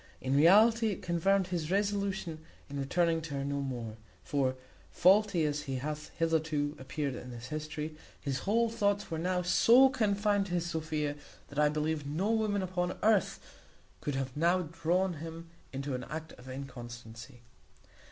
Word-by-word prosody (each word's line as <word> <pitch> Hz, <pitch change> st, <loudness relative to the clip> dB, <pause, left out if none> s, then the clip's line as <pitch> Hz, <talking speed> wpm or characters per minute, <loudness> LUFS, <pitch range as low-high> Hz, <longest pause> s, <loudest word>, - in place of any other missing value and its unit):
In 130 Hz, +1 st, -1 dB
reality, 220 Hz, +9 st, +6 dB
it 205 Hz, -, -3 dB
confirmed 190 Hz, +3 st, +2 dB
his 165 Hz, -4 st, -2 dB
resolution 200 Hz, -4 st, -1 dB, 0.3 s
of 140 Hz, -, -3 dB
returning 165 Hz, +4 st, +1 dB
to 160 Hz, -3 st, -6 dB
her 140 Hz, 0 st, -2 dB
no 140 Hz, 0 st, -1 dB
more; 120 Hz, -5 st, -5 dB, 0.3 s
for, 135 Hz, -3 st, 0 dB, 0.3 s
faulty 190 Hz, -2 st, +4 dB
as 150 Hz, 0 st, -1 dB
he 135 Hz, -, -1 dB
hath 150 Hz, +3 st, -4 dB
hitherto 160 Hz, -3 st, 0 dB
appeared 135 Hz, +1 st, -3 dB
in 125 Hz, +1 st, -8 dB
this 120 Hz, 0 st, -8 dB
history, 155 Hz, 0 st, -4 dB, 0.2 s
his 135 Hz, -3 st, -2 dB
whole 230 Hz, +8 st, +2 dB
thoughts 205 Hz, -4 st, 0 dB
were 160 Hz, -, -2 dB
now 180 Hz, +1 st, 0 dB
so 235 Hz, +9 st, +6 dB
confined 205 Hz, -4 st, +1 dB
to 175 Hz, -, -2 dB
his 175 Hz, -1 st, 0 dB
Sophia, 155 Hz, -3 st, -2 dB, 0.3 s
that 145 Hz, -, -4 dB
I 150 Hz, 0 st, +5 dB
believe 150 Hz, -1 st, -1 dB
no 180 Hz, +9 st, 0 dB
woman 215 Hz, -3 st, +1 dB
upon 180 Hz, -1 st, -2 dB
earth 215 Hz, -3 st, +3 dB, 0.6 s
could 145 Hz, -, -3 dB
have 135 Hz, -1 st, -3 dB
now 170 Hz, +4 st, +3 dB
drawn 170 Hz, +2 st, 0 dB
him 165 Hz, 0 st, -8 dB, 0.2 s
into 140 Hz, +1 st, -4 dB
an 125 Hz, 0 st, -4 dB
act 160 Hz, +1 st, -6 dB
of 130 Hz, +1 st, -13 dB
inconstancy. 120 Hz, -2 st, -9 dB
160 Hz, 160 wpm, -31 LUFS, 140-190 Hz, 0.6 s, reality